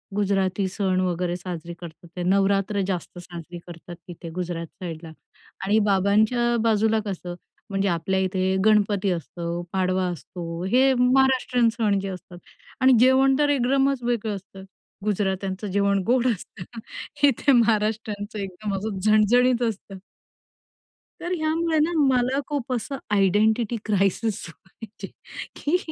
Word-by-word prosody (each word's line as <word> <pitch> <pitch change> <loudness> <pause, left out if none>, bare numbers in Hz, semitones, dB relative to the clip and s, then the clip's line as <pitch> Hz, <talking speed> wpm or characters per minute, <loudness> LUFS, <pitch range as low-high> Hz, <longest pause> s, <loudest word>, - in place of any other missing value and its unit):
गुजराती 195 -1 0
सण 190 -2 0
वगैरे 180 -1 -1
साजरी 170 -2 -6
करतात 170 0 -11
ते 180 - -3
नवरात्र 195 +2 +2
जास्त 180 -1 -4
साजरी 175 0 -9
करतात 175 0 -10
तिथे 170 -1 -9
गुजरात 175 -2 -4
साइडला 165 -1 -8 0.5
आणि 210 +3 +3
बाबांच्या 215 +5 +2
बाजूला 220 0 +2
कसं 180 -3 -5 0.3
म्हणजे 195 0 0
आपल्या 185 +2 0
इथे 190 0 0
गणपती 205 -2 +3
असतो, 170 +1 -4
पाडवा 185 0 +1
असतो. 170 -1 -6
हे 260 +6 +4
महाराष्ट्रीयन 250 -1 +3
सण 210 -4 +2
जे 195 - -4
असतात 180 -1 -9 0.4
आणि 260 0 +6
जेवण 260 +2 +5
तर 295 -1 +3
एकदमच 270 -1 +2
वेगळं 230 -3 -1
असतं 195 0 -11 0.4
गुजरात्यांचं 195 -1 -1
जेवण 200 0 +2
गोड 250 +1 +3
असतं 200 -5 -4 0.6
हे - - +9
इथे 275 +3 +2
महाराष्टचं 215 -3 +1
एकदम 195 +1 -4
असं 200 0 -4
झणझणीत 240 +4 +4
असतं. 195 -2 -8 1.2
तर 350 +1 -2
ह्यामुळे 320 +1 0
ना 315 +3 +2
मला 265 -2 +2
खूप 280 -4 -3
असं 255 +3 -3 0.2
आयडेंटिटी 215 +4 +2
क्रायसिस 200 +1 0
व्हायचे 195 +5 -12 0.5
की 310 +5 +1
200 Hz, 130 wpm, -24 LUFS, 185-240 Hz, 1.2 s, हे